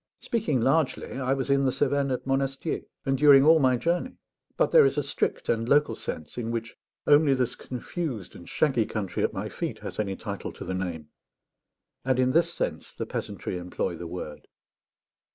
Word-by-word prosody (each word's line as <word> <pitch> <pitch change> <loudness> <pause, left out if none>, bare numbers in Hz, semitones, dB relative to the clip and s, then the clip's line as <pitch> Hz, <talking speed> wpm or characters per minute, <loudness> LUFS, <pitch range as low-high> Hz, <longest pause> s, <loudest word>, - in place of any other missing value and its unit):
Speaking 165 - 0
largely, 135 0 +1
I 135 0 +1
was 135 0 -2
in 140 0 +3
the 130 - +2
Cevennes 140 +1 +1
at 125 - -2
Monastier, 135 +3 -1 0.2
and 135 -1 +2
during 140 0 +7
all 160 +1 +7
my 130 -3 +3
journey; 175 - -1 0.4
but - - +2
there 480 -2 +8
is 410 - +2
a - - +1
strict - - -2
and 115 +1 0
local 145 +1 +4
sense 80 +9 -6
in 115 -1 -3
which 115 -1 -4 0.3
only 145 -1 +5
this 125 -2 -1
confused 125 - -5
and 85 - -11
shaggy 130 -8 +1
country 100 -4 -3
at - - +1
my - - -4
feet - - -4
has - - -6
any 100 -2 -1
title 100 -1 -5
to - - -8
the 95 - -3
name, 85 -5 -4 0.9
and 130 -1 +1
in 130 0 +3
this 165 +5 +3
sense - - -4
the - - -3
peasantry 90 - -4
employ 90 0 -3
the 85 +1 -7
word. 80 -3 -7
130 Hz, 190 wpm, -27 LUFS, 110-145 Hz, 0.9 s, there